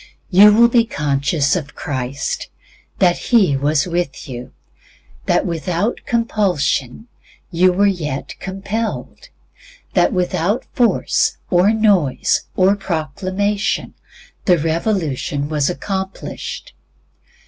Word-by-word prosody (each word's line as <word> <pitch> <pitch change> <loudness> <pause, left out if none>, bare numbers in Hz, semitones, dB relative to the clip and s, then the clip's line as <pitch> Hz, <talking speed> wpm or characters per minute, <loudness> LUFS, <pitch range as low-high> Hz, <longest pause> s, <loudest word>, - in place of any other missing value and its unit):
You 200 +3 +8
will 235 +3 +6
be 235 0 +4
conscious 145 - 0
of 150 -5 -5
Christ; 130 -1 -4 0.5
that 175 -1 +3
He 200 - +4
was 145 +2 +1
with 175 -5 -3
you, 125 -2 -8 0.8
that - - +2
without 175 - -1
compulsion 200 - 0 0.4
you 180 +2 +4
were 195 +3 +2
yet 155 -9 -2
compelled; 210 - -5 0.6
that - - +3
without 180 +3 0
force, 240 -3 +1
or 180 +3 +4
noise, 205 - +2
or 190 +2 +4
proclamation, 190 +4 -2 0.5
the 180 -2 +4
revolution 160 - -1
was 150 -3 +1
accomplished. 190 +5 -5
180 Hz, 100 wpm, -19 LUFS, 150-205 Hz, 0.8 s, You